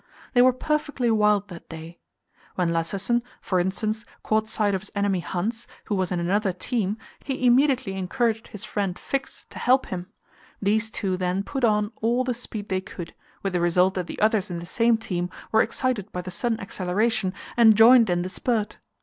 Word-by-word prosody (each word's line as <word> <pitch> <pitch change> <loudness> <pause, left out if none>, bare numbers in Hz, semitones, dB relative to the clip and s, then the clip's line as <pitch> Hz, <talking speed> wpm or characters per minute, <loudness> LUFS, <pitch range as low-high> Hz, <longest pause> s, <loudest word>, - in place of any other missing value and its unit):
They 245 - +6
were 255 +1 +7
perfectly 290 -2 -1
wild 210 -2 +3
that 175 -2 -11
day. 165 +1 -9 0.6
When 180 -2 +1
Lassesen, 195 +8 0 0.2
for 185 - 0
instance, 215 +4 -1 0.2
caught 215 0 +1
sight 210 -2 +1
of 190 - -1
his 210 - -9
enemy 200 -2 +1
Hans, 215 +7 -3 0.2
who 210 - -1
was 185 -1 -1
in 180 - 0
another 195 +3 +1
team, 210 +2 -2 0.3
he 260 -2 -2
immediately 255 -4 +3
encouraged 225 +4 -1
his 210 - -8
friend 195 -3 -2
Fix 275 0 -4
to - - -8
help 260 +1 +3
him. 180 -1 -5 0.5
These 215 +2 +1
two 190 -3 -2
then 185 +1 -1
put 270 +3 -4
on 210 -2 +2
all 240 +3 +2
the 255 -1 -1
speed 220 -3 -7
they 185 0 0
could, 185 -3 -8 0.3
with 195 -1 -1
the 175 - +1
result 180 +2 +3
that 180 -3 -3
the - - -7
others 215 -2 +2
in 175 - -4
the 170 - -6
same 230 +5 +2
team 180 -5 -3 0.2
were 220 - +5
excited 225 -4 -1
by 180 - -3
the 185 - -6
sudden 225 +5 -1
acceleration, 195 +2 0 0.2
and 225 -2 +7
joined 230 -1 +7
in 175 0 +1
the 185 - -4
spurt. 220 +1 -1
210 Hz, 190 wpm, -25 LUFS, 185-230 Hz, 0.6 s, were